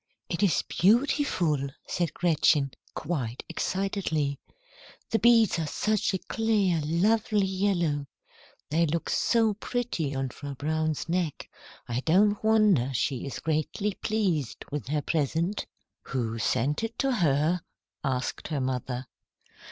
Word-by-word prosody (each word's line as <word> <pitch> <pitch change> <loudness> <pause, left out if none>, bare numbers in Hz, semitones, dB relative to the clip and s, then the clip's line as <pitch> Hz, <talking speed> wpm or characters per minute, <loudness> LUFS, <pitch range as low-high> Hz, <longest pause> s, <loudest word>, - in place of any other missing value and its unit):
"It 170 - -2
is 195 -7 +3
beautiful," 185 - +2 0.2
said 170 -4 -2
Gretchen, 150 -5 +3 0.2
quite 135 -8 -3
excitedly. 180 -7 -1 0.7
"The 225 - +2
beads 225 -4 +5
are 160 - -1
such 210 +4 0
a - - +1
clear, 205 -5 +1
lovely 205 +6 +2
yellow. 180 -7 0 0.6
They 165 +2 +3
look 165 +2 -2
so 225 -2 +3
pretty 205 - -2
on 135 0 -1
Frau 140 +1 -7
Braun's 155 +2 -1
neck, 170 -3 -1 0.4
I 120 +1 -1
don't 200 +9 +3
wonder 210 - +4
she 130 +2 -1
is 135 - -5
greatly 160 +6 -1
pleased 185 - -1
with 145 -1 -4
her 150 +1 -1
present." 165 +5 -1 0.4
"Who 115 -4 -2
sent 135 - 0
it 225 0 -4
to 270 -1 +1
her?" 160 +1 +2 0.4
asked 130 -2 -2
her 150 -3 -2
mother. 130 -1 -2
165 Hz, 125 wpm, -28 LUFS, 140-205 Hz, 0.7 s, beads